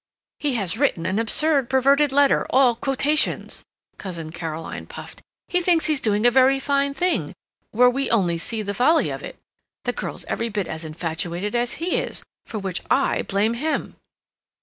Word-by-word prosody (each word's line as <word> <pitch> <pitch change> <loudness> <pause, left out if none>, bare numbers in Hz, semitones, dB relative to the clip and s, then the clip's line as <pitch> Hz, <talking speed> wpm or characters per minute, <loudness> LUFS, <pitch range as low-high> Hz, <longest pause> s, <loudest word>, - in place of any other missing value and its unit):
"He 285 -4 -1
has 210 0 -2
written 225 - +1
an 190 +3 0
absurd 275 +4 +2
perverted 275 +2 +3
letter, 280 0 +3
all 255 -2 +4
quotations," 285 +4 +1 0.4
Cousin 170 -5 -6
Caroline 165 -1 -6
puffed. - - -10 0.3
"He 360 - +1
thinks 340 -2 +3
he's 305 -3 +1
doing 210 0 +1
a 245 - +7
very 265 +2 +4
fine 280 0 0
thing, 360 +2 0 0.4
where 250 +3 +4
we 270 +2 0
only 175 -7 +1
see 220 +5 -3
the 200 0 -3
folly 310 +9 +3
of - - -5
it.... - - -8 0.5
The - - -1
girl's - - -5
every 230 +1 -2
bit 205 -3 -2
as 160 +1 -6
infatuated 170 +5 -3
as 240 0 0
he 345 +2 -1
is—for 225 - -6
which 190 -3 -3
I - - +2
blame 205 +3 0
him." 305 +7 -2
240 Hz, 170 wpm, -23 LUFS, 195-280 Hz, 0.5 s, a